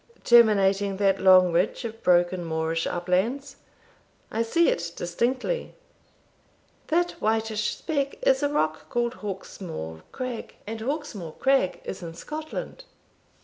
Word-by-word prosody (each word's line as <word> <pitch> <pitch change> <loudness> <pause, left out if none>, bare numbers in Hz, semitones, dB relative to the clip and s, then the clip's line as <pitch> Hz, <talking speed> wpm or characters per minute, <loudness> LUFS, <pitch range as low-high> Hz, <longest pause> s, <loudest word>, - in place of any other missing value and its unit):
"Terminating 200 -4 +4
that 195 -1 +2
long 185 -1 +7
ridge 180 +7 0
of 225 0 -7
broken 175 0 +3
moorish 160 0 -1
uplands? 185 +10 -1 0.7
I 225 - 0
see 335 +9 +3
it 170 0 -1
distinctly." 250 - -2 1.1
"That 350 +2 +2
whitish 220 -1 0
speck 280 -4 -2
is - - +4
a 285 - +1
rock 155 - -1
called 240 0 0
Hawkesmore 175 - -6
crag, 255 -2 -5
and 220 +1 -6
Hawkesmore 235 - -4
crag 270 -9 +2
is 190 - -6
in 165 -1 -7
Scotland." 310 - -6
210 Hz, 120 wpm, -26 LUFS, 180-255 Hz, 1.1 s, long